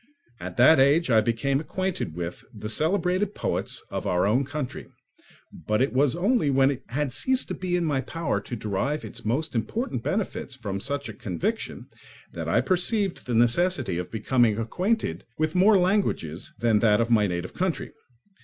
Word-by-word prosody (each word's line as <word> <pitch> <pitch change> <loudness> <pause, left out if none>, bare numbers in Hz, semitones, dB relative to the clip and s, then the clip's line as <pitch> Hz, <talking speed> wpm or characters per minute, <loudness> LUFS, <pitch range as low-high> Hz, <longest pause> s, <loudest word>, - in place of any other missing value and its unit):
At 90 0 -7
that 130 +6 +7
age 140 +2 +4
I 110 -1 +6
became 120 +5 0
acquainted 185 - -3
with 85 0 -5
the 105 0 -7
celebrated 185 - +1
poets - - -2
of - - -3
our 90 +1 +2
own 125 +7 +2
country; 145 -2 -5 0.8
but 105 0 +2
it 135 +2 +1
was 135 +1 +3
only 200 - +2
when 135 0 +4
it 135 - -5
had 135 +3 -2
ceased 260 - 0
to - - -2
be 180 -1 -2
in 175 -1 +1
my 145 -4 0
power 140 -6 -2
to 120 - -6
derive 110 +8 -2
its - - -9
most 130 +9 -1
important 130 - -2
benefits 190 - -3
from 100 -6 -4
such 140 +6 -3
a - - -7
conviction 95 -10 -4 0.5
that 85 -1 -4
I 115 +8 +3
perceived 185 - 0
the 120 - -1
necessity 120 - +2
of 90 - -5
becoming 115 0 +2
acquainted 145 - -1
with 155 +1 0
more 195 +3 +5
languages 180 - 0
than 115 -2 +3
that 105 -1 +4
of 115 +1 0
my 105 -3 +4
native 90 0 -4
country. 185 -2 -2
130 Hz, 175 wpm, -26 LUFS, 110-175 Hz, 0.8 s, that